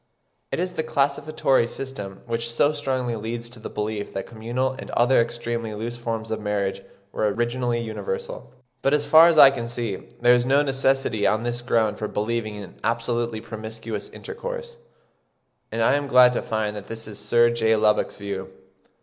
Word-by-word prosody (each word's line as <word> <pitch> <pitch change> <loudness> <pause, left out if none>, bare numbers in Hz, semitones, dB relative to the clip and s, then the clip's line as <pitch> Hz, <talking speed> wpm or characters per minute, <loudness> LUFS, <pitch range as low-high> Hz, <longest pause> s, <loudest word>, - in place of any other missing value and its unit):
It - - -1
is 180 +1 -1
the 160 - -1
classificatory 140 -3 +1
system 105 -7 -7
which 115 0 -3
so 145 +5 +3
strongly 130 -5 -2
leads 115 +2 -5
to 120 - -12
the - - -7
belief 105 -1 -3
that 95 - -3
communal 120 +3 -2
and - - -8
other 120 +1 +4
extremely 115 -1 -3
loose 115 +3 -4
forms 115 -2 -4
of 110 - -2
marriage 100 -2 -1 0.3
were 105 -1 0
originally 120 +2 -1
universal. 475 - -5 0.3
But 140 +2 +3
as 145 -1 0
far 160 +3 +8
as 170 -2 +3
I 140 -2 +10
can 120 -4 -4
see, 115 -4 -3 0.2
there 120 0 +6
is 120 0 +3
no 135 +3 +3
necessity 135 -6 +1
on 110 +3 +1
this 120 0 -2
ground 115 -3 +1
for 105 - -2
believing 110 0 -2
in 100 -4 -10
absolutely 115 0 -1
promiscuous 110 -1 -6
intercourse; 480 +1 -7 1.0
and 115 0 0
I - - +4
am 145 0 0
glad 125 -2 +7
to - - -1
find 110 -1 -2
that 105 -1 -8
this 115 -1 -6
is 105 -1 -8
Sir 120 0 +4
J. 110 -1 +2
Lubbock's 105 -1 +2
view. 100 -2 -5
120 Hz, 180 wpm, -24 LUFS, 110-135 Hz, 1.0 s, I